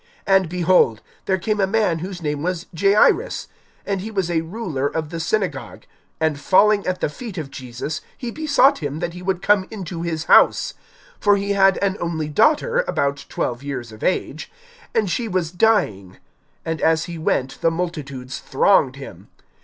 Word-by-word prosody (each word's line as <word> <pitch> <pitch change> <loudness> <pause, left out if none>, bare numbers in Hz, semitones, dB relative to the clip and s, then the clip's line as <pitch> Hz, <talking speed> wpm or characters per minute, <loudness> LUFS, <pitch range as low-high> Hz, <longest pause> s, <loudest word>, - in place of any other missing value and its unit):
(41)And, 190 -3 +3
behold, 175 - +3 0.2
there 190 - +1
came 210 +4 -1
a 195 - +3
man 200 -5 +1
whose 180 0 -6
name 150 -1 -2
was 175 +1 -2
Jairus, 200 +5 +3 0.4
and 195 -2 -2
he 215 - -5
was 190 -5 -2
a 165 -1 +1
ruler 165 -6 -3
of 155 0 -3
the 165 - -4
synagogue; 170 -4 -2 0.4
and 155 -2 0
falling 200 +5 +3
at 185 0 -2
the - - +2
feet 200 +6 -8
of 145 -4 -5
Jesus, 130 +3 -6 0.2
he 240 -2 -5
besought 285 -1 +3
him 145 -1 -4
that 170 +1 -3
he 180 - -9
would 185 0 -2
come 200 -2 +3
into 180 -6 -6
his 165 -2 -2
house; - - +4 0.5
(42)for 205 -1 +4
he 200 0 -2
had 195 -1 +4
an 195 0 0
only 160 -3 -2
daughter, 310 - +3
about 140 0 -1
twelve 120 +1 -2
years 130 -5 -5
of 110 - -12
age, 185 - -2 0.4
and 220 -2 +2
she 230 +6 -1
was 180 -5 -1
dying. 175 - +1 0.5
And 160 -1 -3
as 160 0 +3
he 170 -2 -7
went 135 -4 -1
the 165 - +4
multitudes 145 -7 -5
thronged 135 -2 +2
him. 100 -9 -11
175 Hz, 175 wpm, -21 LUFS, 150-200 Hz, 0.5 s, house